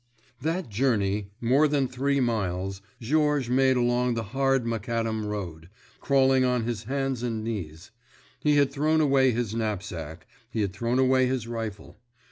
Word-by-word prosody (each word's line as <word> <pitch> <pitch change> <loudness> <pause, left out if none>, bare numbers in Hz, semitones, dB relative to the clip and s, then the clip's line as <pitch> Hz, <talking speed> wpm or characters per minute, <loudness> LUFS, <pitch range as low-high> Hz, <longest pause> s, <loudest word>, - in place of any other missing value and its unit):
That 165 +4 -1
journey—more 110 +3 +1
than 140 -2 +1
three 140 +3 0
miles—Georges 115 - -1
made 130 0 +4
along 120 0 +1
the 115 - -2
hard 135 -2 +2
macadam 115 -1 -2
road, 85 -6 -5 0.3
crawling 135 -1 +3
on 125 -2 +1
his 115 -2 -4
hands 135 -1 -2
and 115 -3 -2
knees. 95 -5 -6 0.5
He 150 +1 +2
had 140 -2 +3
thrown 155 +3 +1
away 135 -3 +4
his 120 -3 -1
knapsack, 90 -8 -4 0.2
he 110 - -2
had 100 -3 -1
thrown 120 +4 -1
away 130 0 +4
his 125 -3 -2
rifle. 110 -3 -6
120 Hz, 140 wpm, -26 LUFS, 105-135 Hz, 0.5 s, made